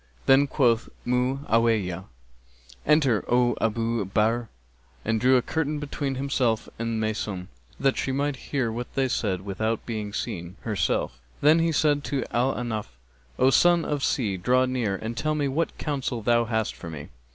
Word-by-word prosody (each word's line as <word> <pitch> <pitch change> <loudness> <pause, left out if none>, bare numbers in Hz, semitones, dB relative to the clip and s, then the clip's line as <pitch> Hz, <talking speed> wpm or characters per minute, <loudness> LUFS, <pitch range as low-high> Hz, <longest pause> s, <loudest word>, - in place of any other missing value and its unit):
[FN#267] - - -29
Then 135 +1 +5
quoth 120 -5 +2 0.2
Mu'awiyah, 115 -7 +1 0.8
'Enter, 140 -8 +4
O 120 -1 +3
Abu 115 0 0
Bahr,' 110 +4 0 0.6
and 110 -1 0
drew 130 +1 +5
a 125 - +1
curtain 155 0 -1
between 145 -2 -3
himself 130 -4 0
and 115 -1 -1
Maysun, 105 -4 -3 0.3
that 135 -1 +2
she 135 - -1
might 140 +1 0
hear 130 -5 0
what 120 +2 -5
they 135 -1 +2
said 100 -7 -1
without 110 +3 -2
being 110 -3 -4
seen 85 -2 -4
herself; 95 - -1 0.2
then 155 +3 +6
he 165 0 +2
said 145 -2 +2
to 135 -3 -1
Al 125 +3 +2
Ahnaf, 115 -4 -3 0.5
'O 130 +1 +4
Son 175 +3 +4
of 145 -1 -1
the - - 0
Sea, 105 -8 0
draw 125 +7 +3
near 125 -6 -1
and 110 +4 -5
tell 155 +6 0
me 145 -2 0
what 155 +5 -1
counsel 135 -6 -3
thou 120 +1 +3
hast 110 -1 -1
for 85 - -9
me.' 75 -3 -8
120 Hz, 170 wpm, -26 LUFS, 110-135 Hz, 0.8 s, then